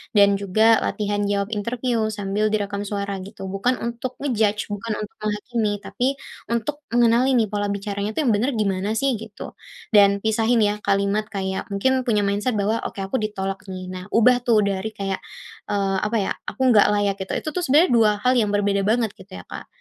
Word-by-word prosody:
Dan 200 -1 +5
juga 215 +3 +4
latihan 205 -1 -2
jawab 200 +1 -1
interview 230 +1 -1
sambil 205 0 -1
direkam 205 -1 -2
suara 200 -1 -3
gitu, 190 0 -8
bukan 220 +6 +1
untuk 235 +2 -4
nge-judge 215 -6 0
bukan 210 +2 -3
untuk 210 - -8
menghakimi, 215 +1 -1
tapi, 250 - -1 0.5
untuk 290 +6 -3
mengenali 240 +2 +3
nih 220 -4 +2
pola 205 -1 -1
bicaranya 200 +1 -3
tuh 315 - +1
yang 250 - +3
benar 235 +6 +1
gimana 200 0 0
sih, 275 +4 +1
gitu. 220 -1 -10 0.3
Dan 200 -2 +5
pisahin 220 +1 +2
ya, 205 0 0
kalimat 200 +2 +1
kayak 190 -1 -3
mungkin 255 +6 0
punya 210 -3 +2
mindset 205 +4 0
bahwa, 210 +2 0
"Oke 195 - -6
aku 195 +7 -1
ditolak 195 -2 -4
nih," 185 -1 -6
nah 185 0 -7
ubah 245 +3 +4
tuh 235 -4 +3
dari 200 +2 -2
kayak, 195 -2 -3 0.5
eee, 195 -1 0
apa 210 +3 -2
ya, 205 -4 0 0.2
aku - - -6
nggak 210 -3 +6
layak 205 -1 +1
gitu. 190 - -4
Itu 310 - -3
tuh 330 - -3
sebenarnya 330 0 +4
dua 225 -3 +5
hal 255 0 +4
yang 205 -2 +1
berbeda 200 -1 +1
banget 225 -1 +2
gitu 190 0 -12
ya, - - -8
Kak, - - -7
210 Hz, 190 wpm, -22 LUFS, 200-230 Hz, 0.5 s, nggak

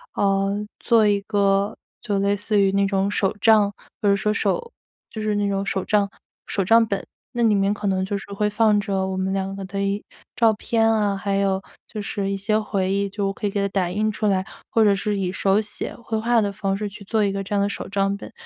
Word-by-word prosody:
呃， 195 0 +2 0.3
做 230 -3 +4
一 205 -1 +2
个 200 0 +1 0.2
就 205 -2 -1
类 200 +1 +2
似 205 +1 0
于 195 -1 +4
那 200 0 +2
种 195 0 0
手 195 -2 +1
账， 215 -2 +5 0.3
比 210 - +1
如 200 - +5
说 210 +2 0
手 470 - -1 0.4
就 220 - -5
是 215 -1 0
那 205 0 +1
种 195 0 -1
手 195 -1 -2
帐 205 -1 +2 0.4
手 195 - 0
账 225 +4 +6
本， 200 - -2 0.3
那 240 -1 0
里 220 - +4
面 195 +1 +2
可 205 -1 -4
能 190 -1 +1
就 200 +1 -2
是 200 0 -10
会 210 +1 0
放 210 0 +3
着 195 -2 -1
我 190 0 -3
们 190 0 -1
两 195 0 -2
个 195 - -6
的 195 +1 -4
一 200 +1 -1 0.3
照 225 -2 +5
片 225 +1 +1
啊， 210 -3 +2
还 200 0 -1
有 195 -1 +1 0.3
就 215 - -6
是 200 -1 -3
一 - - 0
些 215 +2 +1
回 200 -3 -1
忆， 200 0 0
就 200 0 -2
我 195 - -2
可 210 - -6
以 205 - +2
给 200 0 -1
它 200 - +1
打 190 -3 0
印 210 +4 0
出 215 - -3
来， 190 -2 +1 0.2
或 225 - +3
者 205 -2 +5 0.2
以 190 -3 -1
手 195 +1 +2
写 210 -1 -4
绘 225 -2 -4
画 235 +1 +3
的 205 -1 0
方 195 -1 -1
式 210 0 -3
去 205 0 -10
做 220 +1 +1
一 200 - +1
个 195 0 -3
这 195 - -6
样 200 - +2
的 200 - +2
手 200 - -5
账 195 0 0
本。 200 - -9
200 Hz, 265 characters per minute, -23 LUFS, 195-210 Hz, 0.4 s, 账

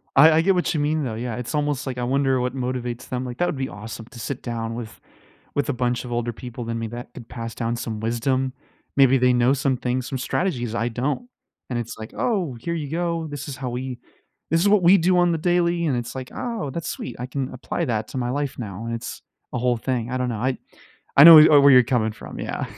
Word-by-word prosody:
I 155 +4 +8
I 160 +1 +4
get 190 +3 +3
what 180 - 0
you 155 - 0
mean, 150 +1 0
though, 120 -5 -3
yeah, 115 0 -4
it's 125 +5 -4
almost 145 -1 -1
like 130 -1 -4
I 125 - -2
wonder 135 +1 +1
what 125 +1 -2
motivates 125 -2 -4
them, 125 0 -3
like, 125 -1 -6
that 175 - +1
would 145 - -2
be 130 0 -2
awesome 110 +1 -8
to 125 - -11
sit 135 +2 -4
down 115 -1 -3
with 115 -2 -8 0.6
with 145 - 0
a - - +1
bunch 125 -1 -1
of 125 - -8
older 120 0 -1
people 120 0 -7
than 115 0 -3
me 115 - -3
that 120 +2 -8
could 115 - -11
pass 115 -2 -6
down 115 0 -2
some 110 -2 -4
wisdom. 130 +3 0 0.5
Maybe 135 -1 +6
they 125 0 +4
know 125 +2 +3
some 135 -1 0
things, 125 +1 -2
some 135 - -3
strategies 125 - -2
I 115 +1 0
don't 140 - -2 0.4
and 125 -2 -1
it's 115 -1 -6
like, 110 +1 -9
"Oh, 185 - -1
here 170 +8 -3
you 150 -4 -4
go. 165 0 -2
This 145 +1 -6
is 140 - -5
how 130 -1 -4
we 125 +1 -5 0.5
this 165 - +3
is 200 - +3
what 205 -2 +4
we 180 +3 +7
do 180 +1 +3
on 175 -1 +4
the 165 - 0
daily," 175 0 +1
and 135 -4 +1
it's 120 +1 -5
like, 130 -1 -6
"Oh, 230 - -3
that's 165 +2 -4
sweet, 125 - -5
I 125 - -3
can 130 0 -4
apply 140 +6 -3
that 110 -5 -1
to - - -6
my 120 -1 -1
life 140 +1 -2
now," 105 -1 -6
and 115 - -3
it's 115 - -7 0.3
a - - -1
whole 125 0 +1
thing. 120 -1 -2
I 130 - -1
don't 125 -1 -1
know. 115 - -3
I 130 +2 0 0.6
I 140 - +10
know 165 -1 +12
w 155 - +6
uh, 145 - +8
where 140 0 +7
you're 125 -1 +8
coming 120 -3 +1
from, - - -10
yeah. - - -3
130 Hz, 260 wpm, -23 LUFS, 120-145 Hz, 0.6 s, know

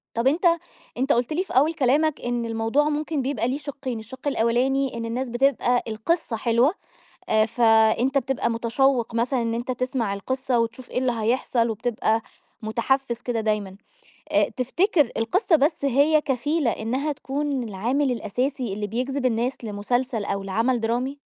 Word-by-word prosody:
طَب 230 +3 +1
أنت 325 +6 +1 0.5
أنت 265 +3 +1
قُلت 245 +6 0
لي 365 +4 0
في - - -10
أول 305 +5 +4
كلامك 295 +2 +2
إن 240 -1 -2
الموضوع 225 +7 +1
ممكن 300 -1 -1
بيبقى 250 -4 -1
ليه 260 +3 -1
شقّين، 275 -5 -5
الشق 255 +5 -9
الأولاني 260 +1 +1
إن 230 - -3
الناس 245 +2 -3
بتبقى 245 0 +2
القصّة 225 +4 -1
حلوة، 235 - +2 0.6
آآ، 215 0 +4
فأنت 225 +3 +3
بتبقى 260 -2 0
متشوّق 235 +1 +1
مثلًا 240 +2 +1
إن 230 0 -1
أنت 240 +2 -3
تسمع 250 -4 -1
القصّة 255 +4 -1
وتشوف 230 +2 -3
إيه - - -4
اللي 255 0 +2
هيحصل، 235 +1 0
وبتبقى 225 0 0 0.4
متحفِّز 235 +2 0
كده 235 -3 -2
دايمًا، 210 -3 -1 0.6
آآ، - - +4
تفتكر 295 - +2
القصّة 325 - +2
بس 295 +1 +1
هي 285 +4 +4
كفيلة 285 0 0
إنها 265 +7 -2
تكون 280 -1 -2
العامل 245 +7 0
الأساسي 250 +1 -2
اللي 210 +1 -3
بيجذب 255 +5 -2
الناس 240 +2 -1
لمسلسل، 225 +2 -1
أو 200 -1 -2
لعمل 225 +5 0
درامي؟ 245 +5 -1
250 Hz, 155 wpm, -24 LUFS, 230-275 Hz, 0.6 s, أول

